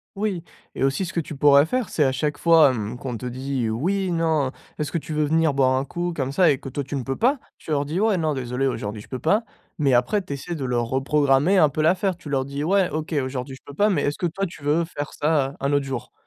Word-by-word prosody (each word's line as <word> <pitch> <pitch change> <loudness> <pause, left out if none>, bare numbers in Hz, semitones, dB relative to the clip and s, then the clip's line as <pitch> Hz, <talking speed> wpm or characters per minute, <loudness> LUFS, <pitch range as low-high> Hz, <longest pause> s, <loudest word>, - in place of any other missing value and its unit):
Oui 195 -4 -2 0.3
et - - -2
aussi 135 +8 0
ce - - -6
que 170 - -1
tu 155 -1 -5
pourrais 140 +1 +6
faire, 250 +1 -2
c'est 150 - +2
à 130 - +1
chaque 145 +2 -1
fois, 165 -4 +6
hem, 115 0 -4
qu'on 125 -3 -5
te 125 - -8
dit: 130 -1 -2
«Oui, 185 - -1
non, 160 -5 +1 0.3
est-ce 150 - -3
que - - +1
tu 160 - -7
veux 155 0 +1
venir 160 0 +2
boire 130 -1 +3
un 135 - 0
coup», 175 +3 -3
comme 135 -2 -2
ça 175 +2 +4
et 140 - +3
que 135 - -8
toi 140 +1 -4
tu 140 - -5
ne 130 - -2
peux 135 +1 -3
pas, 265 +5 +3 0.2
tu 155 - -9
leur 145 -1 +2
dis: 155 +6 -3
«Ouais, 215 -2 +3
non 160 -3 0
désolé, 125 0 -2
aujourd'hui 105 -4 -3
je - - -16
peux 130 - -4
pas», 205 +8 +2 0.3
mais 140 -4 +2
après 125 +12 +2
tu - - -10
essaies 140 +5 -4
de 140 - -5
leur 120 -2 0
reprogrammer 140 +6 +2
un 155 - +6
peu 155 +2 -2
l'affaire. 185 +3 +2
Tu 160 -4 -11
leur 135 -2 0
dis: 140 +1 -4
«Ouais, 190 +2 +2
OK, 155 +1 -4
aujourd'hui 130 0 -5
je - - -17
peux 145 - -10
pas, 205 +7 +3
mais 175 -8 +1
est-ce 145 - -1
que 175 - 0
toi 195 +4 -2
tu 165 -5 -10
veux 155 +3 +2
faire 145 -3 -6
ça, 145 -3 +1
un 140 +1 0
autre 140 -1 +2
jour?» 130 -4 -5
145 Hz, 275 wpm, -23 LUFS, 135-170 Hz, 0.3 s, pourrais